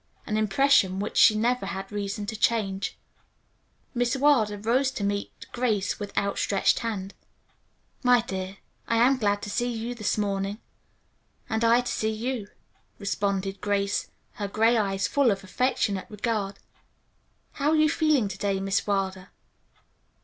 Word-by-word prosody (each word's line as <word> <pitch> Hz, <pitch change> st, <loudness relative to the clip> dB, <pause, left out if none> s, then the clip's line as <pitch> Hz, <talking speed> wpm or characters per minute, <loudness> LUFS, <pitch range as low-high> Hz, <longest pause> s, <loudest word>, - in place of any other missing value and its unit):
An 215 Hz, -, -2 dB
impression 215 Hz, -2 st, +3 dB
which 205 Hz, -, -4 dB
she 215 Hz, -, +7 dB
never 240 Hz, +3 st, 0 dB
had 195 Hz, +3 st, -5 dB
reason 205 Hz, 0 st, -3 dB
to 210 Hz, -, -4 dB
change. 205 Hz, -3 st, 0 dB, 1.0 s
Miss 245 Hz, 0 st, +1 dB
Wilder 260 Hz, -7 st, +3 dB
rose 240 Hz, +6 st, +1 dB
to 265 Hz, -6 st, -5 dB
meet 200 Hz, 0 st, -3 dB
Grace 220 Hz, -5 st, 0 dB
with 205 Hz, -1 st, -5 dB
outstretched 200 Hz, 0 st, +1 dB
hand. 205 Hz, -4 st, -4 dB, 0.9 s
"My 250 Hz, -2 st, +5 dB
dear, 190 Hz, -3 st, -5 dB, 0.3 s
I 230 Hz, -, +1 dB
am 255 Hz, +4 st, +4 dB
glad 205 Hz, -2 st, +1 dB
to 205 Hz, -, -5 dB
see 240 Hz, +4 st, 0 dB
you 230 Hz, +1 st, -4 dB
this 215 Hz, -3 st, -1 dB
morning." 200 Hz, -1 st, -1 dB, 0.9 s
"And 220 Hz, +1 st, 0 dB
I 230 Hz, +1 st, +5 dB
to 245 Hz, -, -4 dB
see 220 Hz, -, 0 dB
you," 225 Hz, 0 st, -3 dB, 0.5 s
responded 200 Hz, -1 st, -2 dB
Grace, 200 Hz, -1 st, 0 dB, 0.2 s
her 205 Hz, -, -4 dB
gray 225 Hz, +4 st, +3 dB
eyes 195 Hz, -3 st, 0 dB
full 280 Hz, -4 st, +3 dB
of 195 Hz, -2 st, -1 dB
affectionate 200 Hz, -2 st, 0 dB
regard. 210 Hz, -2 st, -2 dB, 0.9 s
"How 285 Hz, +1 st, 0 dB
are 315 Hz, -, +3 dB
you 310 Hz, 0 st, +5 dB
feeling 305 Hz, -7 st, +2 dB
to 195 Hz, 0 st, -7 dB
day, 200 Hz, -1 st, 0 dB
Miss 195 Hz, +1 st, 0 dB
Wilder?" 190 Hz, -2 st, -1 dB
210 Hz, 150 wpm, -26 LUFS, 200-240 Hz, 1.0 s, she